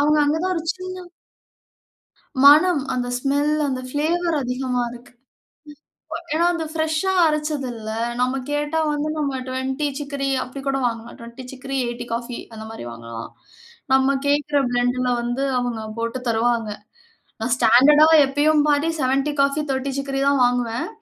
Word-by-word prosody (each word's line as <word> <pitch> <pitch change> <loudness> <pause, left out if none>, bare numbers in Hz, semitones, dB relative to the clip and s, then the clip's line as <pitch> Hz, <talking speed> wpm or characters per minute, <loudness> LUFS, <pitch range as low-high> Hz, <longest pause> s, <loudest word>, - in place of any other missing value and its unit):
அவங்க 300 +1 +3
அங்க 295 +2 +1
தான் 370 0 0
ஒரு 330 - -2
சின்ன 370 0 -7 1.4
மணம் 305 +2 +7
அந்த 245 -1 -2
ஸ்மெல் 285 +3 +1 0.2
அந்த 255 -1 -2
பிளேவர் 330 +3 0
அதிகமா 250 0 -1
இருக்கு. 245 0 -13 1.2
ஏனா 335 +2 +2
அந்த 325 -2 -3
பிரஷா 315 +4 0 0.2
அரைச்சதுல, 275 -8 -3 0.3
நம்ம 255 +1 +1 0.2
கேட்டா 295 +2 -1
வந்து 295 +1 -2
நம்ம 275 -3 -1
20 265 +3 -2
சிக்கரி 280 -1 -3
அப்படி 260 +2 -9
கூட 270 0 +1
வாங்கலாம், 230 0 -6
20 235 +2 -10
சிக்கரி 270 +1 -5
80 240 0 -5
காஃபி 235 +1 -4 0.2
அந்த 220 0 -8
மாதிரி 225 - -8
வாங்கலாம், 115 -1 -8 0.6
நம்ம 265 +1 +4
கேட்கிற 290 0 +1
பிளெண்ட்இல 245 +1 +1
வந்து 240 +3 -2 0.2
அவங்க 240 -3 -3 0.2
போட்டு 230 +2 -2
தருவாங்க. 230 0 +1 0.7
நான் 230 +2 +1
ஸ்டாண்டர்டா 285 +7 +6 0.2
எப்பையும் 295 +2 +2
பாதி 295 +2 +2
70 270 +3 +1
காஃபி, 280 +2 +2
30 265 +1 -2
சிக்ரி 275 0 -2
தான் 280 -2 +3
வாங்குவேன், 245 +4 -1
270 Hz, 140 wpm, -22 LUFS, 245-295 Hz, 1.4 s, மணம்